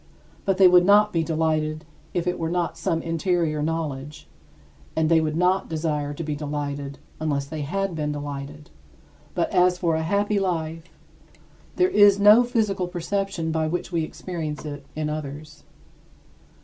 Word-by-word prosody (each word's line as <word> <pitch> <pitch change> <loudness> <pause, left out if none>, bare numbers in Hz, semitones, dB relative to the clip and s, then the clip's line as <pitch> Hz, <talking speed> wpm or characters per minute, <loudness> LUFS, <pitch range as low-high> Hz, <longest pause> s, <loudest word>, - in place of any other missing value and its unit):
But 195 -2 +1
they 190 - +8
would 180 0 +6
not 205 +2 +5
be 165 -1 +1
delighted 155 -1 -1 0.3
if 175 - -1
it 180 - -1
were 165 -1 -1
not 175 0 -1
some 165 -1 -1
interior 165 -2 0
knowledge; 150 -2 -4 0.7
and 160 -1 +2
they 165 -1 +5
would 155 0 -1
not 180 +2 +2
desire 155 -2 -2
to 145 +3 -5
be 150 -1 -3
delighted 145 -1 -4 0.2
unless 145 -3 -1
they 150 +2 -6
had 195 +6 -2
been 150 -2 -2
delighted. 145 0 -7 0.6
But - - 0
as 180 0 +3
for 170 -2 0
a 160 - 0
happy 200 +4 +1
life, 165 -3 -2 0.9
there 365 0 +3
is 205 - +6
no 210 +4 +7
physical 215 -6 0
perception 180 -1 -2
by 160 0 0
which 175 +3 -3
we 170 -2 0
experience 155 -2 -5
it 145 -2 -7
in 155 0 -2
others. 150 0 -7
160 Hz, 160 wpm, -24 LUFS, 150-180 Hz, 0.9 s, they